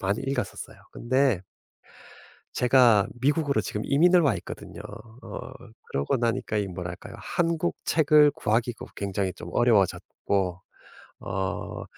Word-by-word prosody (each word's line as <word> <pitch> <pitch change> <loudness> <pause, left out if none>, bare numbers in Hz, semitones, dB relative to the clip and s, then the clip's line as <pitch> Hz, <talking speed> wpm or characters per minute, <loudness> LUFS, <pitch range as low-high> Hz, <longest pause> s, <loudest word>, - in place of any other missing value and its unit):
많이 100 +3 -1
읽었었어요. 135 -2 -4 0.2
근데 130 -5 +1 1.1
제가 120 -5 +5
미국으로 145 -3 +2
지금 105 +1 -4
이민을 175 +6 +5
와 135 -9 +2
있거든요. - - -9 0.4
어 - - -7 0.4
그러고 70 - -1
나니까 115 -2 -1
이 100 -1 -1
뭐랄까요 90 -1 -7
한국 170 0 -1
책을 150 -1 +5
구하기가 115 +2 -1
굉장히 100 -1 -2
좀 - - -10
어려워졌고 100 -4 +1 0.6
어 95 +1 -4
115 Hz, 275 characters per minute, -26 LUFS, 100-140 Hz, 1.1 s, 제가